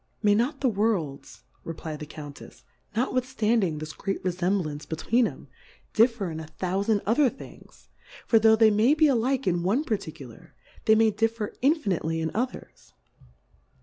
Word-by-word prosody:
May 205 -1 +5
not 250 +7 0
the 270 - +3
Worlds, 195 - -2 0.2
reply 160 -1 -6
d 150 - -8
the 150 - -10
Cotintefs^ 145 -3 -11 0.3
notwithftanding 235 - 0
this 155 +1 -6
great 195 0 -4
Refemblance 175 -4 -2
between 225 +9 +1
'em, - - -10 0.5
differ 225 -5 +2
in 160 - -5
a 160 - -8
thoufand 200 +3 0
other 250 +6 +3
Things; 260 - -14 0.4
for 225 - +4
tho' 220 0 +6
they 220 -1 +5
may 225 +8 +4
be 310 0 +4
alil^e 265 -1 +1
in 175 -2 +1
one 205 - +1
Particu 155 - -4
lar, 115 - -17 0.3
they 220 - +6
may 220 0 +4
differ 225 0 -1
infinitely 195 - +1
in 160 0 -2
Others. 250 +3 -5
210 Hz, 155 wpm, -26 LUFS, 165-235 Hz, 0.5 s, tho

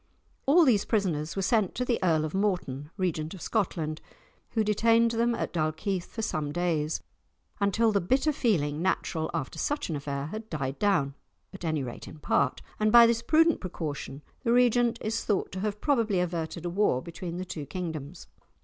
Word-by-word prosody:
All 325 +4 +6
these 220 -7 +4
prisoners 170 -8 -1
were 195 - -1
sent 215 -2 +2
to 250 - -1
the 240 -2 +1
Earl 160 -4 +3
of 155 - -5
Morton, 180 -8 -1
Regent 165 -3 -2
of 180 - -11
Scotland, 165 -7 -1 0.5
who 220 - +2
detained 230 +2 +3
them 235 +1 +1
at - - -3
Dalkeith 175 +3 -1
for 225 - -6
some 150 -7 -2
days, 160 -2 -1 0.6
until 215 +3 +3
the 200 -2 +2
bitter 265 - +2
feeling 160 - +1
natural 170 -3 -1
after 135 - -4
such 290 - -1
an - - -1
affair 140 -1 -3
had 215 +7 -7
died 135 -3 -3
down, 190 -10 +2 0.4
at 195 - -10
any 155 -4 0
rate 120 -2 -7
in - - -10
part, 140 -2 0 0.2
and 215 0 +3
by 235 0 +9
this 230 0 +2
prudent 320 +6 +3
precaution 150 -5 -5 0.2
the 235 - +1
Regent 240 -1 +4
is 220 +1 -2
thought 205 -3 0
to 185 - -5
have 210 +1 -2
probably 230 -9 +2
averted 170 -1 -3
a - - 0
war 180 -9 +2
between 170 0 -6
the 185 - -4
two 155 -5 -6
kingdoms. 160 -1 -5
185 Hz, 185 wpm, -28 LUFS, 155-225 Hz, 0.6 s, by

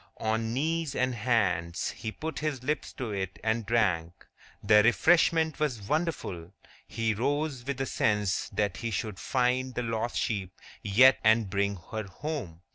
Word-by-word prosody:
On 110 +1 -1
knees 155 +3 -1
and 130 0 +1
hands, 95 -8 0
he 110 - -6
put 160 +7 -5
his 150 -5 -3
lips 150 +3 -2
to 120 -4 -5
it 95 -2 -4
and 110 -1 0
drank. 90 -8 0 0.4
The 105 +1 +6
refreshment 160 +6 +3
was 125 -10 -2
wonderful. 105 - -2 0.3
He 115 -1 -1
rose 140 +3 -1
with 140 -1 -2
a - - 0
sense 105 -4 0
that 100 -2 -1
he 115 - -3
should 105 -2 -3
find 130 0 0
the 125 - -1
lost 115 0 -2
sheep 100 -5 -2 0.2
yet 125 +6 +6
and 110 -2 +3
bring 100 0 0 0.2
her 110 -1 -3
home. 100 - -5
115 Hz, 155 wpm, -29 LUFS, 100-130 Hz, 0.4 s, The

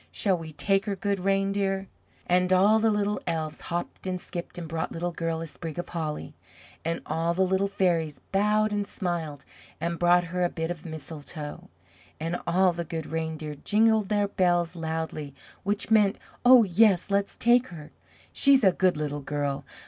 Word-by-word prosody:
Shall 195 -3 +1
we 165 -2 -7
take 195 +8 +1
her, 200 - -1
Good 200 +1 -1
Reindeer?" 195 0 0 0.4
And 180 +1 +2
all 200 +4 +5
the 225 0 +3
Little 210 0 0
Elves 160 -2 -3
hopped 175 +2 -4
and 185 -1 -2
skipped 175 0 -7
and 170 -2 -5
brought 160 0 -3
Little 175 +1 -3
Girl 165 -1 -2
a - - -4
sprig 160 0 -8
of 175 - -4
holly; 155 -3 -4 0.5
and 165 +1 -2
all 165 +2 -1
the 190 - +3
Little 190 +1 +1
Fairies 170 -7 0
bowed 210 +2 +2
and 205 -1 -1
smiled 165 -8 -4 0.3
and 170 +1 -2
brought 175 0 +4
her 180 0 +1
a 175 - +2
bit 165 0 -3
of 175 0 -7
mistletoe; 155 -1 -8 0.5
and 165 +2 -2
all 180 +1 +3
the 170 0 -3
Good 160 -1 -5
Reindeer 160 -1 -4
jingled 220 -1 +3
their 205 -1 +2
bells 175 -3 +1
loudly, 160 -3 -4 0.3
which 205 +2 -2
meant, 210 -3 +4 0.3
"Oh, 250 -1 +8
yes! 200 0 +3
let's 200 0 0
take 240 +2 +4
her! 155 -4 -11 0.4
She's 275 -3 +5
a 190 - +6
good 180 -2 +2
Little 145 -1 -3
Girl! 145 -1 -3
175 Hz, 175 wpm, -27 LUFS, 160-200 Hz, 0.5 s, Oh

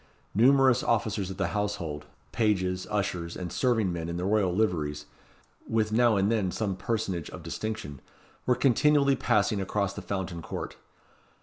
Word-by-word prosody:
Numerous 130 +3 +5
officers 105 -4 0
of 95 - -6
the 95 -3 0
household, 85 -8 -3 0.2
pages, 95 -5 0
ushers, 90 -5 -2
and 90 -2 -5
serving 115 -8 +1
men 85 -1 -4
in 85 - -3
the 90 - -2
royal 100 -2 +2
liveries, 80 -7 -1 0.6
with 110 -1 +1
now 120 0 +4
and 100 +3 +2
then 105 -5 +1
some 100 0 -2
personage 95 -6 -2
of 90 - -9
distinction, 85 -5 -5 0.5
were 125 - +4
continually 140 +2 +4
passing 105 -3 +1
across 100 0 -1
the - - -6
Fountain 95 -3 -4
Court. - - -6
100 Hz, 150 wpm, -28 LUFS, 90-110 Hz, 0.6 s, Numerous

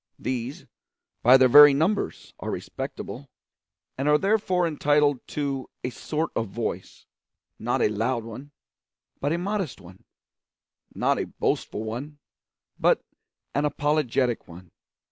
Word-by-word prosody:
These, 125 +2 -4 0.6
by 125 +3 +8
their 130 -1 +6
very 145 +2 +9
numbers, 185 +8 -1
are - - -5
respectable, - - -6 0.7
and 140 +2 +1
are 150 - +6
therefore 190 -1 +1
entitled 145 -3 +2
to 140 -3 -3
a 125 - -2
sort 155 +5 -3
of 115 - -1
voice 95 - -5 0.5
not - - 0
a - - +5
loud 115 +3 -1
one, 115 +6 -9 0.7
but 145 - -1
a 165 - +1
modest 190 - -3
one; 90 +1 -15 0.9
not - - +1
a - - -2
boastful 105 - -2
one, 125 +7 -6 0.6
but - - +3 0.5
an 145 - +1
apologetic 145 -5 0
one. 90 +1 -13
140 Hz, 125 wpm, -25 LUFS, 120-150 Hz, 0.9 s, very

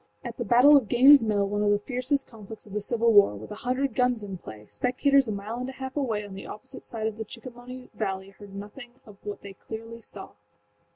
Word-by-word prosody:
At - - -6
the - - -2
battle 255 +5 +7
of 275 -5 +5
Gainesâs 265 +4 +7
Mill, 205 -2 +1
one 205 +1 -1
of 210 - +2
the 205 - +4
fiercest 255 +5 -1
conflicts 220 -2 -10
of 205 - -13
the 210 - -1
Civil 230 +1 +2
War, 200 - +6
with 105 +2 -10
a 210 - -8
hundred 255 +1 -1
guns 250 -3 +1
in 195 -3 -6
play, 105 -7 -11
spectators 270 - +2
a - - -2
mile 210 +4 -5
and 255 +1 -4
a - - -7
half 265 0 -7
away 225 -8 -1
on 200 - -10
the 195 - -8
opposite 210 - -10
side 220 -2 -5
of 220 -1 -2
the - - -2
Chickahominy 245 +3 -11
valley 190 -2 -3
heard 200 0 -13
nothing 225 +5 -9
of 210 -3 -14
what 205 0 -6
they 200 -1 -9
clearly 225 +3 -9
saw. 200 -3 -9
220 Hz, 235 wpm, -27 LUFS, 205-250 Hz, -, battle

